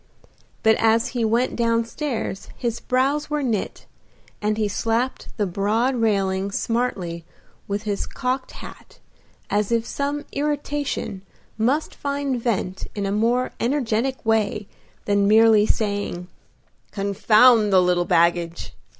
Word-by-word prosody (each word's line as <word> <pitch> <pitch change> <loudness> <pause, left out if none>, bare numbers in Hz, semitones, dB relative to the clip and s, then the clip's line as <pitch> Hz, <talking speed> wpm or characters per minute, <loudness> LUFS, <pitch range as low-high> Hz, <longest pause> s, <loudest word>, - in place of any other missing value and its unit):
But 220 0 +5
as 225 +2 +3
he 240 -2 -2
went 230 +3 +1
down 230 -1 +1
stairs 230 -6 -4
his 235 -2 -2
brows 275 +4 0
were 300 -1 -1
knit, 225 -6 -2 0.6
and 210 0 0
he 215 -1 +1
slapped 230 +5 -1
the 210 - +1
broad 210 +7 0
railing 200 -4 0
smartly 195 -7 -2 0.4
with 205 +1 -3
his 205 -2 -2
cocked 255 +1 -3
hat - - -12 0.5
as 210 +1 0
if 230 -1 +1
some 285 +3 -3
irritation 290 -8 -2 0.3
must 255 +8 0
find 280 -3 -2
vent 195 -5 -2
in 200 -1 -2
a 195 - -1
more 235 +5 +1
energetic 255 0 -1
way 215 -2 +1 0.4
than 200 -1 +2
merely 220 0 +5
saying, 200 -4 -2 0.6
"Confound 215 +2 +4
the 190 - +6
little 180 -1 +2
baggage!" 170 -1 +1
225 Hz, 125 wpm, -23 LUFS, 200-250 Hz, 0.6 s, the